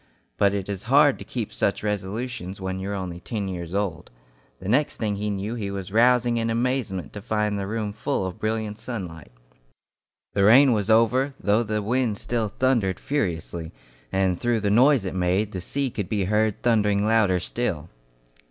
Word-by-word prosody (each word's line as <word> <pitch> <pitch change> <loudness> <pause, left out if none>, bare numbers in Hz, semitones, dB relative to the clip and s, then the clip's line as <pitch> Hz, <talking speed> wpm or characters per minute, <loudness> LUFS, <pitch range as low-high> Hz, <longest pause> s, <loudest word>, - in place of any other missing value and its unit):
But 100 0 +2
it 95 -2 -3
is 100 -2 -4
hard 145 0 +5
to - - -7
keep 115 -5 -5
such 100 - 0
resolutions 105 0 -3
when 95 0 -3
you 95 +1 -4
are 100 - -2
only 90 -3 -5
ten 100 +2 -4
years 90 -1 -5
old. 100 -4 -2 0.5
The 95 - -8
next 140 +8 +2
thing 105 -3 -1
he 105 +1 -2
knew 100 +2 -3
he 105 -4 -3
was 95 -1 -5
rousing 120 +1 +4
in 115 0 0
amazement 115 - -1
to 105 - -7
find 105 -1 0
the 100 - -3
room 105 -1 -3
full 110 -1 -2
of 95 -1 -6
brilliant 110 -1 -2
sunlight. 90 - -7 1.0
The 100 - +2
rain 125 +5 +7
was 105 -1 -1
over, 125 +5 +3
though 105 +3 +2
the 105 -2 -2
wind 120 -1 0
still 115 -1 -1
thundered 110 -5 +1
furiously, 85 - -3 0.4
and 95 -2 +1
through 120 -2 +1
the 100 -1 +1
noise 125 0 +5
it 95 - -3
made, 95 +3 0
the 95 - -5
sea 135 +7 -2
could 100 -5 -4
be 105 -2 0
heard 105 +2 0
thundering 105 -3 +2
louder 105 -5 +3
still. 85 -5 -3
105 Hz, 185 wpm, -24 LUFS, 95-115 Hz, 1.0 s, rain